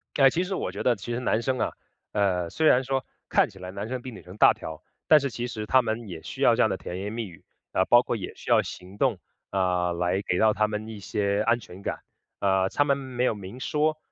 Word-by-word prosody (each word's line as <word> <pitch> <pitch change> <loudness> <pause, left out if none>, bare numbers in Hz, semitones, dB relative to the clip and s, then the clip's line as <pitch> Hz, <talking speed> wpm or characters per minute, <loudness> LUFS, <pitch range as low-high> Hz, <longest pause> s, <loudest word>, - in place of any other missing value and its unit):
呃， 135 -1 +7
其 175 +7 0
实 190 +1 -3
我 90 - -2
觉 100 - -5
得 125 -2 +3
其 120 +5 -5
实 120 - -1
男 115 -2 +1
生 130 0 -1
啊 - - 0 0.4
呃， 90 -4 +1
虽 160 - -1
然 125 - +5
说 135 0 -1 0.2
看 - - +3
起 95 - -15
来 90 0 -7
男 100 +2 -5
生 130 -1 -3
比 130 - -7
女 105 - -11
生 90 +3 -12
大 - - +7
条， 80 -1 -8 0.3
但 155 -1 +8
是 140 -1 -2
其 120 +1 -4
实 110 -3 -5
他 130 +3 +5
们 110 -1 -3
也 85 -3 -7
需 - - -7
要 - - +6
这 - - +2
样 - - +3
的 - - -1
甜 90 +1 -6
言 100 +1 -4
蜜 115 -3 -3
语， 85 - -15 0.3
啊， 95 - +3
包 120 0 +7
括 120 - -2
也 95 - -5
需 - - -10
要 - - +6
行 90 +2 -9
动， 115 -6 +1 0.3
啊， 90 -2 +1
来 90 +3 0
给 90 - 0
到 110 -1 +5
他 105 0 +2
们 105 +1 -4
一 110 -2 -7
些 100 0 0
安 120 +1 +3
全 95 -2 -12
感。 - - -3 0.4
啊， 95 -1 +2
他 145 - +2
们 140 -1 +2
没 130 -2 -3
有 125 - +3
明 100 +5 -9
说， 155 +2 0
110 Hz, 285 characters per minute, -26 LUFS, 95-125 Hz, 0.4 s, 但